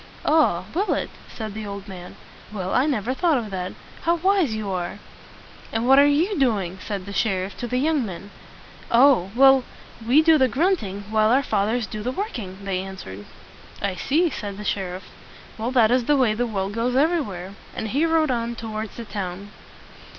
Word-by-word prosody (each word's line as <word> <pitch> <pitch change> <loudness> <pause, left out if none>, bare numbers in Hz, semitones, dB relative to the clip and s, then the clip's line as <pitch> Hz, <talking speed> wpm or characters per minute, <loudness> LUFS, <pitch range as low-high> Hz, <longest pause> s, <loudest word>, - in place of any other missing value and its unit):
"Ah! 295 - +3
will 390 +6 +1
it?" - - -3 0.2
said 220 -3 -6
the 215 +1 -6
old 200 0 -7
man. 180 -2 -9 0.4
"Well, 190 -3 -4
I 260 +4 +3
never 255 -4 0
thought 320 +1 +2
of 220 -4 -4
that. 185 -1 -4 0.3
How 335 +1 +2
wise 370 - +2
you 215 -2 -3
are!" 180 -2 -3 0.7
"And 225 +2 -1
what 270 +1 +7
are 285 - +7
you 330 +6 +1
doing?" 195 -8 0
said 200 -3 -4
the 200 - -7
sheriff 195 -2 -1
to 240 - -4
the 250 - -1
young 295 +1 +1
men. 200 -1 -7 0.6
"Oh, 260 +1 +5 0.4
we 265 +7 +4
do 320 -1 +5
the 260 - +5
grunting 255 - 0
while 215 0 +3
our 265 +4 +4
fathers 220 +1 0
do 215 0 -6
the 245 +4 -2
working," 210 - -5
they 190 -2 -1
answered. 185 - -8 0.5
"I 200 -1 -1
see," 310 - +1
said 205 -5 -5
the 210 - -7
sheriff. 185 -2 -3 0.6
"Well, 225 +2 -1
that 240 -3 +4
is 250 -1 +2
the 295 +2 +3
way 250 -5 +3
the 240 +3 -1
world 200 -2 -3
goes 235 +3 -1
every 320 +5 +3
where." 190 -5 -7 0.2
And 220 - -3
he 280 +8 +1
rode 325 -3 +2
on 235 -1 -2
toward 220 -1 -5
the 235 - -8
town. 200 -1 -5
225 Hz, 190 wpm, -23 LUFS, 195-275 Hz, 0.7 s, what